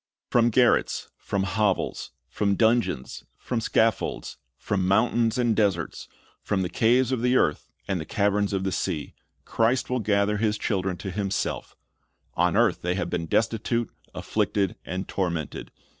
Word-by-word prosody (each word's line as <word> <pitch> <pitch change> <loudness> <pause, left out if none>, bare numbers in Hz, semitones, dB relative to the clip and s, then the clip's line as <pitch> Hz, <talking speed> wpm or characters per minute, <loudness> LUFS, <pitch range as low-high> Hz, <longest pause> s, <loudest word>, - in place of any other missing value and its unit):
"" - - -67
From 120 -1 +4
garrets, 120 +1 +2
from 100 -1 -2
hovels, 100 -1 0 0.2
from 100 -1 0
dungeons, 110 - +1
from 120 -3 -3
scaffolds, 110 -1 0 0.2
from 95 +6 -1
mountains 115 +3 +2
and 120 -3 +2
deserts, 100 -6 0 0.3
from 95 -2 -1
the 90 - -2
caves 120 +2 +3
of 130 -3 0
the 125 +1 +2
earth 75 - +1 0.2
and 95 -4 -1
the - - -6
caverns 100 +3 +1
of 95 -1 -1
the 95 - -1
sea, 80 -4 -3 0.3
Christ 120 +3 +1
will 125 - +1
gather 105 -1 +1
His 105 0 +1
children 95 -4 -1
to 95 +2 -5
Himself 100 +1 -3 0.6
On - - +2
earth - - +3
they 90 +1 -1
have 90 - -3
been 85 -1 -2
destitute, 115 +3 0 0.2
affiicted, 100 -3 0
and 95 +2 -4
tormented. 85 -5 -3
105 Hz, 155 wpm, -26 LUFS, 95-115 Hz, 0.6 s, From